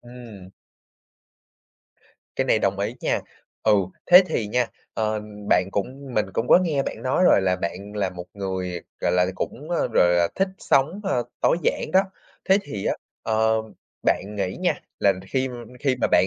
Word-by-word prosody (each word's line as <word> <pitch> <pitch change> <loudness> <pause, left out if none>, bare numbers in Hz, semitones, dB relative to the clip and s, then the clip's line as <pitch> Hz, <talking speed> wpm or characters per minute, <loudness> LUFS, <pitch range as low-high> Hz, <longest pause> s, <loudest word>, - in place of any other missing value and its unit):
Ừm. 120 -6 -12 1.9
Cái - - +1
này - - +3
đồng 100 0 0
ý 105 +4 -2
nha, - - 0 0.4
ừ, 110 - +4 0.3
thế 180 +2 +9
thì 110 - -1
nha, 125 +3 +1 0.3
ờ, 110 -1 -1 0.3
bạn 90 +1 +3
cũng 130 +6 -4
mình 105 - +2
cũng 115 +5 -1
có - - +8
nghe 160 -7 0
bạn 115 - -6
nói 130 +8 +2
rồi, 100 - +6
là 95 -1 +2
bạn 90 +3 -5
là 100 -3 0
một 90 -1 -8
người, 95 -3 -3 0.2
gọi - - +1
là, 90 0 +3
cũng, 145 - -5
ờ, 175 - +1
gọi 90 - +5
là, 85 -1 +3
thích 195 0 +1
sống, 155 +9 +2
a, 195 - 0 0.2
tối - - +3
giản - - 0
đó. 190 - +7 0.5
Thế 190 - +6
thì 105 -9 -6
á, - - +1 0.3
ờ, 110 0 +2 0.5
bạn 105 +2 0
nghĩ 95 -2 -2
nha, - - +2 0.3
là 100 - +5 0.2
khi 130 +3 0 0.3
khi 135 -3 +1
mà - - +3
bạn - - +5
110 Hz, 180 wpm, -24 LUFS, 95-135 Hz, 1.9 s, thế